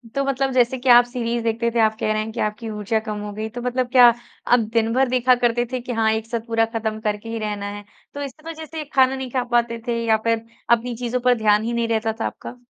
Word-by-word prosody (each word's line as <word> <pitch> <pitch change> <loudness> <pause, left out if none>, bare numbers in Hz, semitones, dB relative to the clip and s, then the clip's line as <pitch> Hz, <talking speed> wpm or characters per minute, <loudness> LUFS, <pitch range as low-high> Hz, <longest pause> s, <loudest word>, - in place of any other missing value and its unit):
तो 275 - +1
मतलब 270 0 0
जैसे 250 +1 +2
कि 255 0 -1
आप 240 0 +8
सीरीज़ 240 -1 -3
देखते 230 +1 0
थे, 235 - -1
आप 220 0 +3
कह 215 - 0
रहे 215 - 0
हैं 220 +1 -5
कि - - -7
आपकी 215 +2 -2
ऊर्जा 210 +1 -1
कम 210 -1 -3
हो 210 0 -5
गई। 215 +1 -4
तो 245 +2 -7
मतलब 250 0 -1
क्या 250 -2 +8 0.4
आप 245 - +5
दिन 230 0 +1
भर 265 +1 +3
देखा 255 0 +3
करते 240 0 +1
थे 255 - -2
कि 250 - -6
हाँ, 225 -1 +2
एक 220 0 -2
साथ 235 0 -2
पूरा 225 0 +2
ख़त्म 220 -1 -2
करके 210 +1 -3
ही 230 - -3
रहना 210 -2 -3
है। 205 0 -8 0.3
तो 285 - -6
इस 275 -2 -5
वज़ह़ 320 -1 -7
से 315 0 -6
खाना 265 -1 +4
नहीं 265 -1 -5
खा 255 -2 0
पाते 235 -1 +1
थे 230 -1 -1
या 220 -1 +4
फिर 230 0 +1 0.3
अपनी 240 +1 -6
चीज़ों 245 +1 -2
पर 250 0 +5
ध्यान 210 0 +3
ही 235 +1 -2
नहीं 235 0 0
रहता 220 -1 0
था - - 0
आपका? 245 - -9
235 Hz, 270 wpm, -22 LUFS, 220-250 Hz, 0.4 s, आप